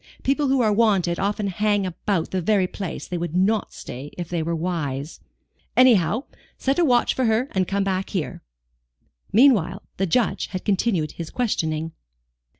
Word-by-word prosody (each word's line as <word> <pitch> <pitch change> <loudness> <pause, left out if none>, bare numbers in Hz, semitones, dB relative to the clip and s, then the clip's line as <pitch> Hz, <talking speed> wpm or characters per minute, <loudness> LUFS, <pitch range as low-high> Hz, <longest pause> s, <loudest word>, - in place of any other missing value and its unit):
People 280 +2 +1
who 265 -1 +3
are 215 -3 +3
wanted 200 -6 +2
often 205 +1 -1
hang 205 +1 +1
about 185 0 -2
the 185 - -1
very 195 +1 +2
place 185 -1 -6
they 175 - -3
would 170 -1 -4
not 200 +4 +1
stay 125 +3 -8
in 145 - -12
if 175 -2 -5
they 175 -2 -1
were 165 +1 -1
wise. 155 -4 -3 0.6
Anyhow, 235 -2 +5 0.3
set 270 +4 0
a - - +4
watch 245 -6 +3
for 260 - 0
her 225 +4 +1
and 185 -2 0
come 200 0 0
back 190 -1 -1
here." 185 -6 -3 0.9
Meanwhile, 210 - +4
the 195 - 0
Judge 235 +7 +1
had 185 -2 -6
continued 190 -6 +1
his 165 -2 -7
questioning. 165 -9 -1
195 Hz, 170 wpm, -23 LUFS, 170-220 Hz, 0.9 s, Anyhow